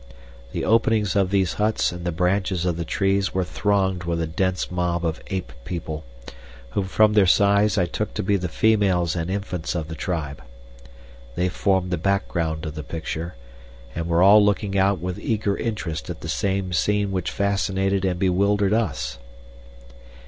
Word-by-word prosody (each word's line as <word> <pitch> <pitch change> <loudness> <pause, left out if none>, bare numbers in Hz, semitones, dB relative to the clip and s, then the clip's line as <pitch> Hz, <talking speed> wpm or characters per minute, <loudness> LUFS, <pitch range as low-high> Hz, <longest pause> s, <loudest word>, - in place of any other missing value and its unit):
The - - -3
openings 110 -3 +2
of 100 -2 +2
these 95 -2 +1
huts 110 -2 +2
and 85 0 -7
the 85 - 0
branches 90 +1 0
of 90 -2 0
the 85 - -3
trees 95 +3 0
were 95 - +2
thronged 95 +1 0
with 85 -1 -1
a 80 - 0
dense 90 +3 -1
mob 85 -1 -1
of 80 -1 -2
ape 95 -11 -4
people, 80 -3 -5 0.7
whom 100 - -1
from 105 +3 +3
their 105 -3 +5
size 100 +2 +4
I 90 - +3
took 85 - -4
to - - -1
be 100 +2 +2
the 90 -3 -2
females 95 -4 +2
and 85 0 -2
infants 95 -4 -3
of 80 -2 -3
the - - -5
tribe. 80 -5 -4 0.9
They 90 +1 +1
formed 95 -1 0
the 90 - 0
background 85 -4 -1
of 75 - -5
the 75 - -5
picture, 80 +2 -5 0.6
and 85 0 -3
were 85 +1 +3
all 105 +2 +8
looking 100 -1 0
out 95 0 +3
with 90 +2 -4
eager 105 -3 0
interest 90 -9 -4
at 85 - -6
the - - -6
same 95 -1 -1
scene 105 +2 +1
which 95 -2 -1
fascinated 95 -1 0
and 90 -2 0
bewildered 100 +2 +2
us. 85 - -1
95 Hz, 175 wpm, -23 LUFS, 85-100 Hz, 0.9 s, all